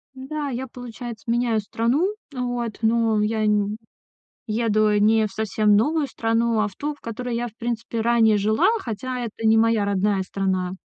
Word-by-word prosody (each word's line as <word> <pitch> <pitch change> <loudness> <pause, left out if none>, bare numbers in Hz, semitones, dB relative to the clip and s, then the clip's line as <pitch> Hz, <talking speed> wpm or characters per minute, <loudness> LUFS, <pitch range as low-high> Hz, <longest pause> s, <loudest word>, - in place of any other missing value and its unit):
М-да, 285 +2 -4
я, 260 +1 -4
получается, 240 -2 -8
меняю 235 -2 +1
страну 245 - 0 0.2
вот, 245 -3 -3
но 225 -1 +2
я 215 +1 0
н 210 0 +1 0.7
еду 215 -1 +2
не 220 +1 +4
в - - -14
совсем 215 -1 +2
новую 295 +7 +2
страну, 230 -1 0
а 215 - +2
в 195 - -12
ту, 295 +1 -3
в 290 - -21
которой 235 +1 -4
я 240 +1 -1
в 220 - -14
принципе 230 -1 -3
ранее 225 -2 +4
жила, 215 - +3
хотя 250 - -4
это 225 -1 -5
не 220 0 +5
моя 225 -2 +3
родная 200 0 +1
страна. 185 -1 -2
225 Hz, 170 wpm, -23 LUFS, 215-240 Hz, 0.7 s, не